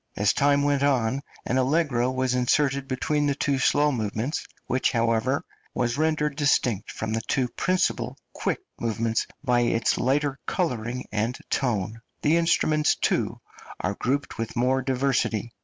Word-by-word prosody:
As 100 0 +2
time 140 0 +3
went 145 -1 +2
on, 135 -2 +2 0.2
an 130 - +1
allegro 130 -3 +2
was 130 -1 0
inserted 135 +2 +1
between 145 +3 0
the 140 - +1
two 140 -1 0
slow 145 +3 +3
movements, 110 +3 -2 0.2
which, 130 - +1
however, 115 +3 +1 0.3
was 120 0 0
rendered 150 -1 +1
distinct 130 -8 +1
from 110 - -4
the 115 - 0
two 125 +3 0
principal 135 -9 0 0.2
quick - - -2 0.2
movements 115 0 0 0.2
by 125 -3 +3
its 115 -1 +1
lighter 140 +2 +1
colouring 125 - -2
and 110 +4 -1
tone; 115 -3 -1 0.2
the 155 +3 +4
instruments, 155 -2 +3
too, - - 0 0.4
are 95 - -1
grouped 135 +6 -2
with 115 +1 -3
more 130 +2 +2
diversity. 125 -4 0
130 Hz, 145 wpm, -25 LUFS, 115-145 Hz, 0.4 s, the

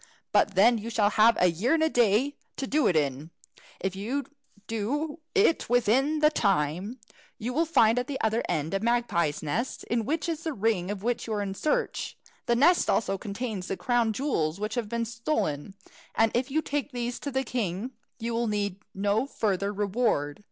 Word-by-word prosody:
But 200 - +3
then 225 +5 +5
you 225 +2 -6
shall 210 -2 +2
have 225 +2 +5
a 180 -1 +4
year 225 - +1
and 320 - +2
a - - +4
day 245 +1 +2 0.2
to 270 - -2
do 300 +3 +2
it 180 - +2
in. 145 0 0 0.5
If 190 0 -2
you 240 +9 -2 0.4
do 290 +9 -2 0.2
it 395 - +3
within 250 +6 +2
the 300 0 +5
time, 195 - 0 0.4
you 240 +3 -4
will 330 +4 +1
find 230 -7 +4
at 250 - -3
the 280 -2 -4
other 220 +1 +1
end 160 0 -1
a 195 - +1
magpie's 205 -10 0
nest, 225 - -2
in 230 0 -1
which 320 +6 -1
is 325 -2 -2
the 320 - -2
ring 200 -5 0
of 205 -1 -4
which 240 0 -1
you 220 - -2
are 205 - -1
in 195 -1 -3
search. 300 +9 -1 0.3
The 235 - +3
nest 320 +8 +4
also 195 -3 +1
contains 205 -2 -4
the 195 - -3
crown 240 -2 +1
jewels 200 - -1
which 215 +1 -3
have 230 -3 -2
been 235 0 -1
stolen, 225 - -2 0.4
and 225 -1 +3
if 250 +3 0
you 315 +3 0
take 290 0 -2
these 245 -1 -3
to 285 - -4
the 265 -1 -1
king, 225 -1 -3 0.3
you 235 0 -3
will 235 0 0
need 205 -3 -1 0.2
no 205 +6 +1
further 200 -6 -1
reward. 200 -8 0
225 Hz, 195 wpm, -27 LUFS, 195-255 Hz, 0.5 s, then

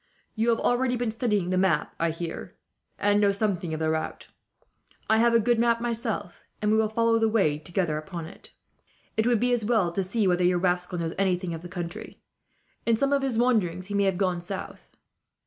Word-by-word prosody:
"You 225 +1 0
have 230 - +3
already 245 +1 +1
been 240 -2 -1
studying 210 -6 0
the 185 - +2
map, 180 -6 +1
I 165 - +2
hear, 165 +1 -6 0.4
and 205 0 +2
know 200 -1 +4
something 195 -5 -1
of 155 - -3
the 160 0 +1
route. 160 0 -4 0.8
I 220 0 +4
have 235 0 +4
a - - +6
good 235 +1 +2
map 235 0 +3
myself, 230 -5 -3 0.2
and 210 0 +1
we 220 - +4
will 220 -1 +2
follow 230 +1 +2
the 225 0 +2
way 175 -10 +2
together 170 0 -1
upon 165 +1 -6
it. 165 - -13 0.7
It 220 +1 +1
would 240 -3 +3
be 245 +2 +2
as 240 -3 0
well 210 -6 +2
to 195 - -1
see 195 +3 0
whether 180 0 +2
your 180 0 +3
rascal 180 0 0
knows 165 -1 -2
anything 180 -2 0
of 165 - -6
the 175 - -9
country. 175 -2 -7 0.6
In 230 - +3
some 275 +5 +1
of 280 - +2
his 265 -4 -1
wanderings, 200 -8 +1
he 205 - -6
may 200 0 +2
have 190 -2 +1
gone 180 -3 0
south." 190 +2 -7
200 Hz, 215 wpm, -26 LUFS, 175-230 Hz, 0.8 s, a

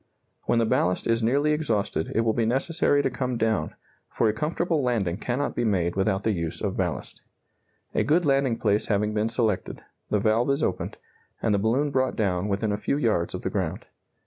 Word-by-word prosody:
When 120 - +3
the 115 - +3
ballast 90 -4 +1
is 115 0 +1
nearly 140 +7 +2
exhausted 110 - -1
it 115 - +3
will 115 -1 +1
be 115 - +1
necessary 145 +4 +2
to - - +2
come 125 0 -2
down, 110 -1 0 0.3
for 115 - +1
a 105 - +2
comfortable 160 +5 0
landing 110 -9 0
cannot 125 +6 -2
be 120 - 0
made 90 -6 +1
without 95 +1 0
the 110 - +2
use 85 -5 -3
of - - -2
ballast. - - -3 0.7
A - - +2
good 165 +4 +2
landing 135 -4 +2
place 105 0 +1
having 105 0 +1
been 110 +1 0
selected, 115 -4 -1 0.3
the 105 - +2
valve 110 +5 +2
is 140 +2 +1
opened, - - -2 0.4
and 110 - +1
the 100 - +2
balloon 130 +8 +1
brought 130 -1 +1
down 95 -3 0
within 105 +1 0
a 105 - 0
few 140 - -1
yards 110 - 0
of - - -6
the - - -2
ground. - - -2
115 Hz, 200 wpm, -26 LUFS, 105-135 Hz, 0.7 s, When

